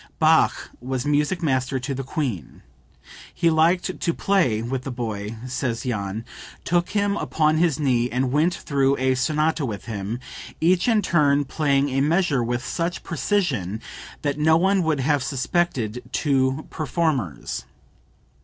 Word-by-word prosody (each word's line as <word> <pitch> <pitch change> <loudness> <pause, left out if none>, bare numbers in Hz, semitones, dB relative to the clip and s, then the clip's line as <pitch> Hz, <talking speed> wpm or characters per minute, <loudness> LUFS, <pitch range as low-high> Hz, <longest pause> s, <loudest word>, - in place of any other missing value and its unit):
[Bach - - +3
was 130 0 -3
Music 150 +5 +1
Master 130 -2 0
to 135 +2 -3
the 135 - -3
Queen. 125 - -4 0.7
"He 170 - +2
liked 170 +4 +2
to 170 - 0
play 130 - +1
with 125 +2 -2
the 135 - -6
boy," 110 -4 -4
says 125 -2 -2
Jahn; 110 -2 -3 0.4
"took 175 0 +1
him 200 0 +1
upon 155 0 +1
his 165 -4 +2
knee 125 -4 +2
and 125 +1 0
went 155 +5 +3
through 140 -1 +1
a 130 0 +2
sonata 150 +4 +1
with 105 -7 -4
him, 110 0 -4 0.4
each 175 +5 +3
in 220 -3 +3
turn 145 -5 +3
playing 140 0 +1
a 135 +1 0
measure 150 -4 +2
with 120 +1 -2
such 170 0 -2
precision 130 - -1 0.4
that 145 0 -1
no 160 +1 +5
one 190 +2 +3
would 160 -4 0
have 145 +1 +2
suspected 130 -4 -1
two 135 0 +1
performers. 150 - -2
140 Hz, 145 wpm, -23 LUFS, 125-160 Hz, 0.7 s, no